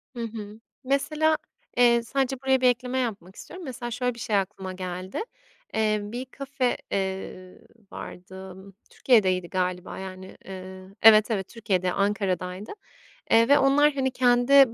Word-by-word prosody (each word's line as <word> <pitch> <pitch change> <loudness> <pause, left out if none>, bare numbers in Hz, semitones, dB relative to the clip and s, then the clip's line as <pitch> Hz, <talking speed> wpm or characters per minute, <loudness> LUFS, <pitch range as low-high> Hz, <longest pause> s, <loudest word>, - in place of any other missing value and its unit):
Hı 235 - -4
hı. 215 -1 -7 0.2
Mesela, 305 +4 +1 0.4
eee, 235 -1 +5
sadece 270 +2 -1
buraya 265 -1 +2
bir 255 - +5
ekleme 250 +1 0
yapmak 200 -6 -4
istiyorum. 360 -1 -10
Mesela, 245 -2 -6
şöyle 250 +1 -1
bir 235 - -11
şey 220 -4 -1
aklıma 190 -1 -3
geldi. 185 - -5 0.5
Eee, 215 -1 +1
bir 240 +5 -5
kafe, 265 -1 -2
eee, 190 -1 -4 0.3
vardı, 190 +1 -9 0.3
Türkiye'deydi 185 -8 +2
galiba, 180 -1 -2
yani, 190 0 -9
ııı, 190 +1 -9
evet, 215 0 +7
evet, 195 -3 -1
Türkiye'de, 185 -5 -1
Ankara'daydı. 195 -1 -1 0.6
Eee, 230 +1 +6
ve 285 - +7
onlar, 290 +2 +4
hani, 265 -2 0
kendi 250 0 +5
220 Hz, 140 wpm, -26 LUFS, 190-255 Hz, 0.6 s, evet